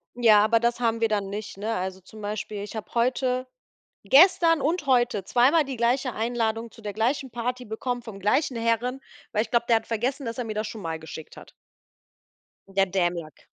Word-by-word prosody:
Ja, 220 Hz, -4 st, +6 dB
aber 225 Hz, +1 st, +3 dB
das 235 Hz, +1 st, 0 dB
haben 230 Hz, -1 st, 0 dB
wir 225 Hz, -, +4 dB
dann 200 Hz, -2 st, -1 dB
nicht, 205 Hz, -1 st, -6 dB
ne? 220 Hz, +3 st, -2 dB
Also, 185 Hz, +1 st, -3 dB
zum 215 Hz, +4 st, -13 dB
Beispiel, 210 Hz, 0 st, -4 dB
ich 210 Hz, -, -8 dB
habe 205 Hz, -5 st, -6 dB
heute 255 Hz, +1 st, 0 dB, 0.6 s
gestern 330 Hz, 0 st, +6 dB
und 325 Hz, +2 st, 0 dB
heute 240 Hz, -6 st, +2 dB
zweimal 265 Hz, -, +4 dB
die 270 Hz, -1 st, -5 dB
gleiche 245 Hz, +1 st, +1 dB
Einladung 225 Hz, 0 st, -1 dB
zu 230 Hz, -, -15 dB
der 205 Hz, -2 st, -5 dB
gleichen 250 Hz, +4 st, -1 dB
Party 245 Hz, +1 st, -3 dB
bekommen 245 Hz, +3 st, -3 dB
vom 220 Hz, -4 st, -9 dB
gleichen 245 Hz, +7 st, +1 dB
Herren, 230 Hz, +3 st, 0 dB, 0.3 s
weil 215 Hz, -, +1 dB
ich -, -, -12 dB
glaube, 235 Hz, -1 st, +2 dB
der 230 Hz, -1 st, +5 dB
hat 220 Hz, -, -7 dB
vergessen, 250 Hz, +4 st, -2 dB
dass 230 Hz, +2 st, -4 dB
er 245 Hz, -, -3 dB
mir 220 Hz, -, -4 dB
das 215 Hz, 0 st, -2 dB
schon 215 Hz, 0 st, -8 dB
mal 160 Hz, -2 st, -4 dB
geschickt 160 Hz, 0 st, -10 dB
hat. -, -, -13 dB, 1.2 s
Der 195 Hz, 0 st, +2 dB
Dämlack. 175 Hz, -5 st, -2 dB
230 Hz, 200 wpm, -25 LUFS, 210-250 Hz, 1.2 s, Ja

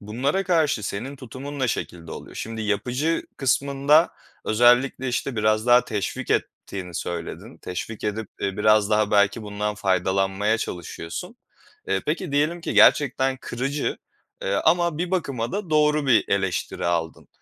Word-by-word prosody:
Bunlara 130 Hz, -, -1 dB
karşı 160 Hz, -, +2 dB
senin 115 Hz, +8 st, -4 dB
tutumun 135 Hz, +3 st, -8 dB
ne 130 Hz, -2 st, +1 dB
şekilde 85 Hz, -6 st, -4 dB
oluyor? -, -, -9 dB
Şimdi 115 Hz, 0 st, -5 dB
yapıcı 125 Hz, +10 st, 0 dB
kısmında 140 Hz, +4 st, +3 dB, 0.3 s
özellikle, 125 Hz, +3 st, +3 dB
işte, 125 Hz, +1 st, -2 dB
biraz 110 Hz, +1 st, +2 dB
daha 125 Hz, 0 st, +6 dB
teşvik 105 Hz, -5 st, -3 dB
ettiğini 90 Hz, -3 st, -3 dB
söyledin. 85 Hz, 0 st, -5 dB
Teşvik 100 Hz, +4 st, -6 dB
edip, 105 Hz, 0 st, -2 dB
eee, 95 Hz, -1 st, -2 dB
biraz 105 Hz, 0 st, +4 dB
daha 105 Hz, -1 st, +2 dB
belki 100 Hz, +2 st, +3 dB
bundan 105 Hz, 0 st, -3 dB
faydalanmaya 95 Hz, +2 st, +1 dB
çalışıyorsun. 90 Hz, -, -6 dB, 0.5 s
Eee, -, -, 0 dB
peki, 160 Hz, +1 st, -2 dB
diyelim 155 Hz, +4 st, +1 dB
ki -, -, -4 dB
gerçekten 135 Hz, -1 st, +4 dB
kırıcı, 135 Hz, +4 st, -2 dB, 0.5 s
eee, 95 Hz, -, -1 dB
ama 170 Hz, -1 st, +3 dB
bir 175 Hz, +1 st, -2 dB
bakıma 135 Hz, -11 st, -2 dB
da 200 Hz, -4 st, -4 dB
doğru 150 Hz, -1 st, +3 dB
bir 120 Hz, -4 st, +4 dB
eleştiri 95 Hz, -3 st, -1 dB
aldın. 85 Hz, -2 st, -2 dB
120 Hz, 140 wpm, -24 LUFS, 100-145 Hz, 0.5 s, daha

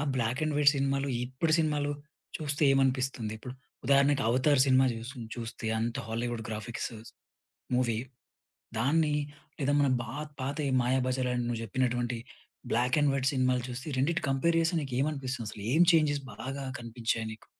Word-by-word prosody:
ఆ -, -, 0 dB
black 120 Hz, +3 st, 0 dB
and 155 Hz, -1 st, -1 dB
white 145 Hz, -1 st, +6 dB
సినిమాలు, 140 Hz, 0 st, 0 dB, 0.2 s
ఇప్పడు 130 Hz, +6 st, -1 dB
సినిమాలు 150 Hz, -2 st, +1 dB, 0.5 s
చూస్తే 150 Hz, -1 st, -2 dB
ఏమనిపిస్తుంది? 130 Hz, -4 st, +1 dB
ఇప్పుడు 125 Hz, +3 st, -8 dB, 0.3 s
ఉదాహరణకి 140 Hz, 0 st, +4 dB
'అవతార్' 130 Hz, +2 st, +4 dB
సినిమా 130 Hz, 0 st, +5 dB
చూసుంచు 115 Hz, -1 st, -8 dB
చూస్తే 115 Hz, -1 st, -6 dB
అంత 115 Hz, +4 st, -1 dB
హాలీవుడ్ 115 Hz, 0 st, -2 dB
గ్రాఫిక్స్ 110 Hz, +2 st, -4 dB, 0.8 s
మూవీ 120 Hz, -3 st, +1 dB, 0.8 s
దాన్ని 150 Hz, +4 st, +2 dB, 0.4 s
లేదా 140 Hz, +1 st, +1 dB
మన 140 Hz, -, +3 dB
బా 110 Hz, -, -7 dB, 0.3 s
పాత 140 Hz, +3 st, -2 dB, 0.2 s
'మాయాబజార్' 130 Hz, 0 st, +1 dB
అని 120 Hz, -1 st, 0 dB
నువ్వు 115 Hz, -1 st, -2 dB
చెప్పినటువంటి 120 Hz, +1 st, 0 dB, 0.5 s
బ్లాక్ 125 Hz, +5 st, +2 dB
అండ్ 145 Hz, -1 st, +4 dB
వైట్ 135 Hz, 0 st, +1 dB
సినిమాలు 130 Hz, -1 st, +2 dB
చూస్తే 125 Hz, +4 st, -6 dB
ఈ -, -, -4 dB
రెండిటిని 165 Hz, +5 st, +1 dB
కంపేర్ 165 Hz, +5 st, +2 dB
చేస్తే 165 Hz, +1 st, +1 dB
నీకు 135 Hz, -3 st, -4 dB
ఏమనిపిస్తుందసలు? 130 Hz, -8 st, -3 dB
ఏం 165 Hz, -, +5 dB
చేంజెస్ 145 Hz, -3 st, +3 dB
బాగా 135 Hz, +1 st, -5 dB
కనిపించాయి 115 Hz, -1 st, -2 dB
నీకు? 110 Hz, -, -16 dB
130 Hz, 150 wpm, -30 LUFS, 120-140 Hz, 0.8 s, వైట్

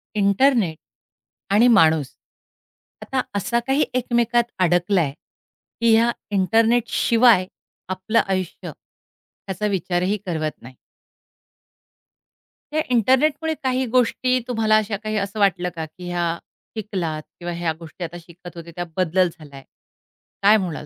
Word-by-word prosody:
Internet 200 Hz, -, +2 dB, 0.8 s
आणि 230 Hz, +4 st, +5 dB
माणूस, 160 Hz, -, +4 dB, 0.9 s
आता 265 Hz, -1 st, -1 dB
असा 235 Hz, +4 st, 0 dB
काही 270 Hz, +3 st, +2 dB
एकमेकात 240 Hz, -1 st, +1 dB, 0.2 s
अडकलाय, 175 Hz, -2 st, +2 dB, 0.7 s
की 230 Hz, -1 st, +4 dB
या 230 Hz, +2 st, +4 dB, 0.2 s
इंटरनेटशिवाय 225 Hz, +1 st, +3 dB, 0.4 s
आपलं 190 Hz, +4 st, 0 dB
आयुष्य, 185 Hz, -2 st, -3 dB
त्याचा 195 Hz, +2 st, -9 dB
विचारही 185 Hz, 0 st, 0 dB
करवत 155 Hz, -3 st, -2 dB
नाही. 130 Hz, +2 st, -13 dB, 2.0 s
या 310 Hz, -, +2 dB
इंटरनेटमुळे 280 Hz, +7 st, +2 dB
काही 260 Hz, 0 st, 0 dB
गोष्टी 255 Hz, +1 st, +2 dB
तुम्हाला 220 Hz, -3 st, +2 dB
अशा 215 Hz, -1 st, -1 dB
काही 215 Hz, 0 st, -3 dB
असं 200 Hz, +1 st, -3 dB
वाटलं 180 Hz, -3 st, +2 dB
का, 160 Hz, -1 st, -4 dB
की 175 Hz, +3 st, -10 dB
ह्या 170 Hz, -1 st, -1 dB, 0.4 s
शिकलात 180 Hz, -7 st, -3 dB, 0.2 s
किंवा 175 Hz, 0 st, -4 dB
ह्या 170 Hz, -1 st, -2 dB
गोष्टी 165 Hz, +2 st, -9 dB
आता 175 Hz, +1 st, -6 dB
शिकत 175 Hz, +1 st, -13 dB
होते, 170 Hz, 0 st, -9 dB
त्या 175 Hz, -, -3 dB
बदल 185 Hz, +1 st, +2 dB
झालाय, 140 Hz, -3 st, -12 dB, 0.8 s
काय 210 Hz, +2 st, +7 dB
म्हणाल 175 Hz, -7 st, -4 dB
195 Hz, 120 wpm, -22 LUFS, 175-235 Hz, 2.0 s, काय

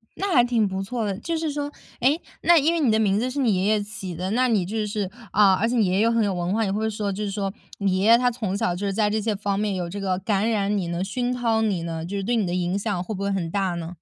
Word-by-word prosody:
那 390 Hz, -1 st, -1 dB
还 245 Hz, -5 st, +6 dB
挺 235 Hz, -4 st, +2 dB
不 190 Hz, 0 st, -3 dB
错 225 Hz, +2 st, -3 dB
的。 195 Hz, -2 st, -2 dB
就 330 Hz, +4 st, -2 dB
是 315 Hz, -2 st, -2 dB
说， 290 Hz, 0 st, -3 dB, 0.3 s
诶， 280 Hz, +7 st, +3 dB, 0.2 s
那 345 Hz, -1 st, +6 dB
因 315 Hz, +3 st, +3 dB
为 335 Hz, -, 0 dB
你 260 Hz, -7 st, +3 dB
的 220 Hz, -, +3 dB
名 205 Hz, -1 st, +2 dB
字 250 Hz, +2 st, -1 dB
是 280 Hz, +3 st, -4 dB
你 225 Hz, -7 st, +2 dB
爷 185 Hz, +1 st, 0 dB
爷 215 Hz, -1 st, +2 dB
起 200 Hz, -4 st, -7 dB
的， 185 Hz, +3 st, -3 dB
那 255 Hz, +3 st, +2 dB
你 210 Hz, -7 st, +1 dB
就 215 Hz, +2 st, -2 dB
是 205 Hz, -3 st, -2 dB, 0.2 s
啊， 200 Hz, -2 st, +5 dB
而 200 Hz, +5 st, +1 dB
且 245 Hz, -, -1 dB
你 225 Hz, -4 st, +3 dB
爷 180 Hz, -, 0 dB
爷 195 Hz, -, +2 dB
又 230 Hz, -, +3 dB
很 230 Hz, -1 st, +2 dB
有 200 Hz, -, 0 dB
文 175 Hz, +1 st, -2 dB
化， 225 Hz, +1 st, +1 dB
也 190 Hz, -, -1 dB
会 220 Hz, +2 st, 0 dB
说 210 Hz, -1 st, -2 dB
就 205 Hz, +2 st, -4 dB
是 205 Hz, -, -2 dB
说， 195 Hz, -1 st, -3 dB, 0.3 s
你 195 Hz, -2 st, +1 dB
爷 200 Hz, -, +1 dB
爷 230 Hz, +1 st, +7 dB
他 245 Hz, 0 st, +2 dB
从 210 Hz, -5 st, -3 dB
小 175 Hz, -, 0 dB
就 200 Hz, +3 st, -4 dB
是 195 Hz, -, -1 dB
在 210 Hz, 0 st, +2 dB
这 215 Hz, +1 st, 0 dB
些 215 Hz, -1 st, -1 dB
方 200 Hz, 0 st, -1 dB
面， 210 Hz, -2 st, 0 dB
有 175 Hz, -2 st, -3 dB
这 200 Hz, +3 st, -5 dB
个 190 Hz, -2 st, -1 dB
感 205 Hz, +2 st, 0 dB
染 205 Hz, -2 st, +1 dB
你 185 Hz, -4 st, -1 dB
呢， 170 Hz, +2 st, -2 dB
熏 245 Hz, +5 st, -2 dB
陶 230 Hz, -3 st, +1 dB
你 200 Hz, -6 st, 0 dB
呢， 165 Hz, -1 st, -4 dB
就 200 Hz, +3 st, -5 dB
是 195 Hz, -, -2 dB
对 240 Hz, +4 st, 0 dB
你 215 Hz, -4 st, +1 dB
的 175 Hz, -, -2 dB
影 180 Hz, +1 st, 0 dB
响 200 Hz, -4 st, -2 dB
会 215 Hz, -, -5 dB
不 195 Hz, -, -5 dB
会 200 Hz, 0 st, 0 dB
很 170 Hz, -4 st, -2 dB
大 190 Hz, -3 st, 0 dB
呢？ 170 Hz, +1 st, -6 dB
205 Hz, 345 characters per minute, -24 LUFS, 190-230 Hz, 0.3 s, 爷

